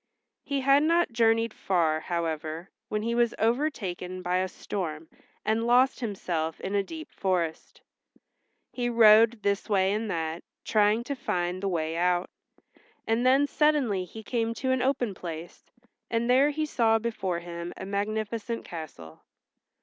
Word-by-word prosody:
He 280 -1 -2
had 275 +2 +5
not 335 -1 +2
journeyed 225 -1 +2
far, 165 -4 +1
however, 165 0 -3 0.2
when 210 0 -2
he 230 +1 -1
was 235 -1 +2
overtaken 205 - -1
by 180 +1 +1
a 185 +1 0
storm 165 -4 -5 0.4
and 220 +2 +1
lost 250 +2 +4
himself 175 -8 -3
in 195 - -4
a 200 - +3
deep 315 +10 -8
forest. 175 -4 -2 0.9
He 245 -1 -1
rode 225 -1 +6
this 200 +1 0
way 195 -1 +3
and 215 +1 -2
that, 165 -1 -3 0.2
trying 215 +2 +3
to 280 - -3
find 180 -6 -2
the 200 - -1
way 165 -2 -2
out, 180 +1 +1 0.7
and 225 +2 +1
then 270 +2 +5
suddenly 285 -11 +2
he 220 +4 -10
came 230 0 -1
to 260 +1 -1
an 260 -1 +1
open 250 -5 0
place, 170 -2 -8 0.4
and 230 0 0
there 260 +4 +5
he 310 +1 -1
saw 230 -6 +2
before 215 -6 -2
him 170 0 -6
a - - -6
magnificent 215 +3 -3
castle. 135 - -9
210 Hz, 150 wpm, -27 LUFS, 175-235 Hz, 0.9 s, rode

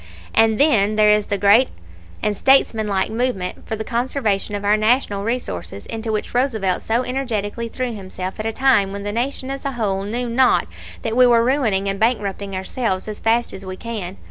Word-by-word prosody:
"And, 225 -1 +4
then, 215 -8 +3
there 210 0 +5
is 210 -1 +2
the 200 - -1
great 205 +6 +5 0.5
and 210 -1 +1
statesmanlike 215 -7 +2
movement 225 -6 -2
for 220 - -2
the 220 - -4
conservation 230 -4 -1
of 205 0 -4
our 205 +1 +4
National 215 -2 +1
resources, 100 - -4
into 225 0 -4
which 215 -1 -3
Roosevelt 225 -8 0
so 230 +3 0
energetically 235 -4 -3
threw 250 +1 -3
himself 190 -1 -6
at 215 - -2
a - - 0
time 230 -5 +3
when 200 0 -6
the 205 - -3
Nation 260 +3 -2
as 275 - -5
a 275 -1 -2
whole 205 -5 -1
knew 235 +5 -3
not 250 +2 +3 0.4
that 225 - -2
we 250 0 +6
are 235 -1 +5
ruining 230 -7 +1
and 195 0 -2
bankrupting 205 -4 -1
ourselves 190 0 -2
as 210 -1 -6
fast 230 +1 +1
as 190 - -8
we 185 0 -7
can. 205 -5 -6
220 Hz, 195 wpm, -20 LUFS, 200-245 Hz, 0.5 s, we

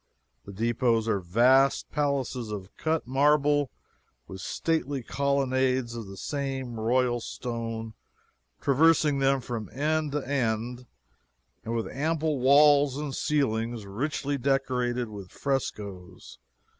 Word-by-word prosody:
The 100 - -9
depots 115 +2 +1
are 105 -3 +1
vast 125 +9 +3
palaces 135 -5 -1
of 100 -2 -7
cut 160 0 -1
marble, 145 +1 +3 0.6
with 95 0 -8
stately 145 -5 -1
colonnades 130 -2 0
of 115 -3 -6
the 95 0 -10
same 135 -3 -4
royal 120 +2 +1
stone 115 -2 -5 0.7
traversing 150 0 +3
them 135 0 +2
from 115 -5 -5
end 150 +1 -1
to 145 -3 -2
end, 125 -2 -1 0.8
and 115 +1 -3
with 115 - -1
ample 155 0 -1
walls 140 +1 +5
and 145 -2 -4
ceilings 115 -7 -1
richly 140 +6 -2
decorated 125 -2 0
with 100 -4 -9
frescoes. 100 -9 -4
130 Hz, 115 wpm, -27 LUFS, 115-140 Hz, 0.8 s, walls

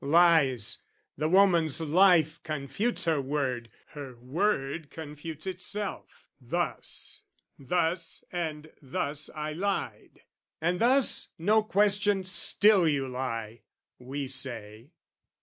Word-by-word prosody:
Lies! 145 - +4 0.4
The 155 +2 -1
woman's 170 -5 +4
life 165 0 +4
confutes 155 - -2
her 160 -4 +2
word, 130 -4 -2 0.2
her 140 -4 -9
word 140 - -1
Confutes 155 0 -8
itself: 195 +2 -4
"Thus, 170 +7 -3 0.4
thus 165 +4 -1
and 155 -3 -4
thus 145 +2 -3
I 155 0 -3
lied." 195 +4 -4 0.4
"And 175 +2 0
thus, 260 +2 +4
no 210 +6 +3
question, 205 -1 +2
still 185 +1 +4
you 140 -3 0
lie," 115 -3 -4 0.4
we 135 +3 -5
say. 120 -3 -2
155 Hz, 100 wpm, -28 LUFS, 135-180 Hz, 0.4 s, Lies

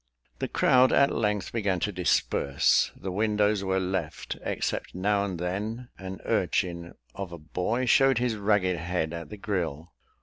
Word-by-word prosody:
The - - -1
crowd 130 0 +4
at 140 0 +4
length 105 -4 0
began 100 -5 0
to 105 - 0
disperse; 90 -6 +2
the 95 - -5
windows 105 0 +1
were 95 0 +1
left, 95 0 -3
except - - -3
now 100 +2 +1
and 95 -3 -3
then 105 +8 -4
an 95 0 -7
urchin 85 -1 -1 0.2
of 95 -3 -6
a 85 - -7
boy 90 +10 -2
showed 135 +1 +5
his 120 -2 0
ragged 100 -3 +1
head 85 -1 -2
at 85 -3 -6
the 105 - -8
grille. 85 -6 -3
95 Hz, 160 wpm, -27 LUFS, 90-105 Hz, 0.2 s, showed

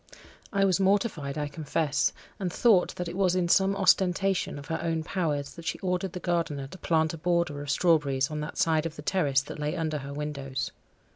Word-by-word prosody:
I 195 -1 +3
was 190 -1 +2
mortified, 190 -8 +1
I 150 -1 -1
confess, 145 -1 0 0.3
and 185 -3 -2
thought 205 -1 +3
that 180 - -4
it 170 - -5
was 185 -2 +2
in 180 -2 +1
some 195 +2 +4
ostentation 190 -2 +2
of 145 - -8
her 160 +1 -3
own 165 -1 -1
powers 150 -5 -2
that 170 - -11
she - - -2
ordered 180 0 -2
the 180 - -4
gardener 165 -6 -1
to 140 - -10
plant 160 -1 +1
a 165 - -7
border 170 -3 0
of 145 - -7
strawberries 150 -4 +2
on 150 - -3
that 150 +1 -5
side 160 -1 +2
of 160 - -9
the 150 - -9
terrace 145 -7 +2
that 140 - -9
lay 150 +3 -1
under 155 -3 -1
her 140 0 -7
windows. 140 -2 -4
165 Hz, 210 wpm, -28 LUFS, 145-180 Hz, 0.3 s, some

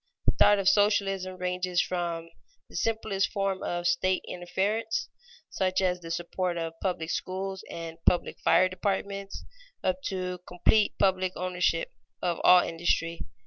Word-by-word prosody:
The - - +5
thought 205 - +5
of 195 -1 -1
socialism 195 -2 +2
ranges 180 0 -1
from 170 -2 -2 0.4
the - - -15
simplest 220 -3 0
form 195 -2 -1
of 175 0 -3
state 180 +2 +1
interference, 205 +5 -1 0.4
such 185 -1 0
as 180 -2 +1
the 165 - -8
support 175 +1 -2
of 165 -1 -3
public 175 -4 -2
schools 190 +1 -3
and 165 0 -7
public 175 - +2
fire 185 - +4
departments, 195 +1 -3 0.4
up 185 0 0
to 180 -2 -3
complete 205 +4 +2
public 185 -2 +2
ownership 180 -2 0 0.3
of 175 -2 -1
all 180 0 +8
industry. 165 0 -1
185 Hz, 140 wpm, -28 LUFS, 175-195 Hz, 0.4 s, all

